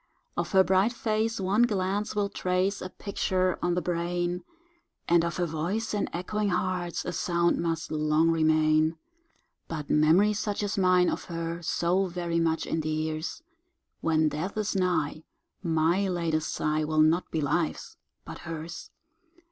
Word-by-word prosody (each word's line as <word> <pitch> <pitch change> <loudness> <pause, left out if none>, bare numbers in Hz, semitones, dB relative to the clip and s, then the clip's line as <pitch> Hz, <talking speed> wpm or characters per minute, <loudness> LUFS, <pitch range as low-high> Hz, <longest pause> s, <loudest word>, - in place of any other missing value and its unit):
Of - - -3
her 190 -1 +7
bright 190 +5 +3
face 225 -1 -1
one 195 +4 +2
glance 205 -2 0
will 205 -1 +1
trace 185 +1 -1
A 185 - -5
picture 185 -2 -1
on 175 0 +1
the 180 - -1
brain, 175 +1 -1 0.6
And 170 0 +4
of 170 0 -2
her 180 - +1
voice 170 +9 -2
in 205 - -1
echoing 205 +4 -2
hearts 180 -1 -1
A 180 - -3
sound 170 -1 +1
must 165 -2 -2
long 155 +1 +2
remain; 155 0 +3 0.7
But 155 -3 -5
memory, 165 +8 +4
such 210 0 -2
as 205 +1 -1
mine 185 -2 +4
of - - -2
her, 165 0 -4
So 175 +3 +1
very 170 -1 -2
much 165 -1 +1
endears, 155 - -2 0.6
When 160 -1 +2
death 165 +8 -4
is 210 -1 -1
nigh 165 -5 0 0.4
my 170 +3 +2
latest 165 -4 -1
sigh 155 0 0
Will 155 0 +2
not 160 +3 +3
be 160 - -2
life's, 155 +2 -1 0.3
but - - -8
hers. 165 +1 -7
175 Hz, 150 wpm, -28 LUFS, 160-190 Hz, 0.7 s, her